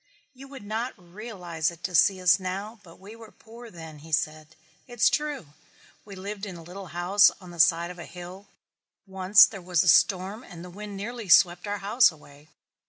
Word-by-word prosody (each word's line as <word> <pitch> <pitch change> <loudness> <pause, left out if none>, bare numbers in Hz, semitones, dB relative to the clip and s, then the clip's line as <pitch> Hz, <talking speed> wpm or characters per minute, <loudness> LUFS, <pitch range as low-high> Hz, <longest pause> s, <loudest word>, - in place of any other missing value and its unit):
"You 270 +1 -13
would 270 -4 -11
not 220 +4 -4
realize 175 -4 -5
it 170 0 -14
to 185 - -4
see 190 +3 +4
us 180 +1 +4
now 195 +4 -6
but 170 -4 -17
we 200 +4 -12
were 225 -1 -13
poor 230 +1 -14
then," 160 -5 -11
he 160 +2 -14
said. 155 +2 -2 0.3
"It's 240 -2 +2
true. 290 - -3 0.5
We 200 -2 -11
lived 200 +2 -7
in 185 - -8
a 165 - -11
little 185 +3 -10
house 180 +4 +4
on 180 -2 -13
the 170 - -12
side 170 +1 +3
of 180 - -12
a - - -8
hill. 180 +3 -11 0.6
Once 190 +1 +5
when - - -9
there 195 -4 -9
was 180 -2 +2
a - - -3
storm 190 - +2 0.2
the 180 - -11
wind 205 +1 -9
nearly 225 0 -7
swept 175 +2 +4
our 205 0 -2
house 210 +4 +3
away. 150 -1 -18
190 Hz, 200 wpm, -26 LUFS, 175-210 Hz, 0.6 s, Once